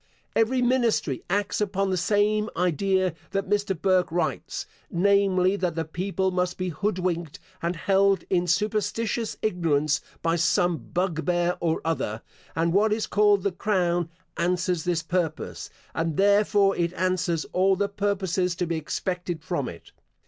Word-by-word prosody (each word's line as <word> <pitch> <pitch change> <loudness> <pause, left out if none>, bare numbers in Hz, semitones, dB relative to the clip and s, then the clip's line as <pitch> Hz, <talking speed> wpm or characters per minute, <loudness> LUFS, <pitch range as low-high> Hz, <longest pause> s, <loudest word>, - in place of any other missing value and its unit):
Every 250 +3 +2
ministry 240 - +1
acts 200 +2 0
upon 195 -1 0
the - - +1
same 210 +4 +1
idea 185 +1 +1 0.2
that 195 0 -2
Mr. 205 -3 0
Burke 185 -2 +2
writes, 175 +1 -2 0.2
namely, 195 0 +3
that 180 -4 -1
the 165 -1 -1
people 190 +3 -1
must 180 0 -1
be 185 0 -2
hood 200 +5 -1
winked, 170 -4 -2 0.2
and 170 +1 -1
held 195 +2 +2
in 180 -1 +1
superstitious 215 +4 0
ignorance 155 -7 +1 0.2
by 165 +1 +2
some 175 0 +2
bugbear 175 0 0
or 165 -2 0
other; 115 -9 -2 0.3
and 165 +1 +1
what 210 +3 +3
is 215 +1 0
called 205 -2 +3
the 200 - +1
crown 175 -3 0 0.3
answers 180 -1 0
this 170 -2 0
purpose, 170 -2 -2 0.2
and 165 -2 -1
therefore 200 0 +4
it 170 0 0
answers 180 -3 0
all 190 +1 +3
the 200 +1 0
purposes 190 -3 -1
to 180 - -1
be 165 -1 -2
expected 175 +1 -3
from 145 -8 -2
it. 85 - -12
185 Hz, 150 wpm, -26 LUFS, 170-200 Hz, 0.3 s, therefore